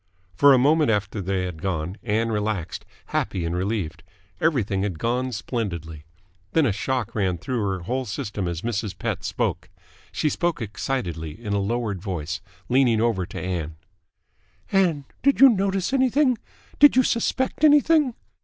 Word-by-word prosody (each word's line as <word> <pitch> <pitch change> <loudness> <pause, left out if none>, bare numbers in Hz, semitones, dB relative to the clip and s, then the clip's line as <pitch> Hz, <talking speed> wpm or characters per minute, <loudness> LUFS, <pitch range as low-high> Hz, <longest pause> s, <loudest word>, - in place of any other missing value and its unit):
For 140 +11 +6
a 135 - +7
moment 150 +3 +4
after 105 -1 0
they 95 0 -1
had 90 -4 -6
gone, 90 -1 -2
Ann 115 +1 0
relaxed, 105 -5 -3 0.3
happy 90 -3 -1
and 85 +1 -2
relieved. 90 -4 -2 0.4
Everything 115 -12 +1
had 95 -5 -2
gone 125 +6 -1
splendidly. 85 - -4 0.5
Then 160 -2 +4
a 115 - +2
shock 120 +3 -2
ran 95 -4 0
through 120 +6 -2
her 95 -2 -1
whole 125 +8 -2
system 100 -2 -4
as 85 -1 -4
Mrs. 110 -3 -3
Pett - - -3
spoke. - - -2 0.4
She - - 0
spoke 170 +2 0
excitedly, 95 - -4
in 105 -3 -4
a 100 - +1
lowered 105 -2 -2
voice, 85 -3 -4 0.3
leaning 125 -3 +3
over 110 -6 +1
to - - -7
Ann. 85 -4 -3 1.0
"Ann! 175 -8 +2 0.2
Did 280 +1 +3
you 270 0 +10
notice 195 +1 0
anything? 260 -1 +3 0.4
Did 290 -3 +8
you 260 - +5
suspect 260 +5 0
anything?" 295 -3 +5
110 Hz, 155 wpm, -24 LUFS, 95-145 Hz, 1.0 s, you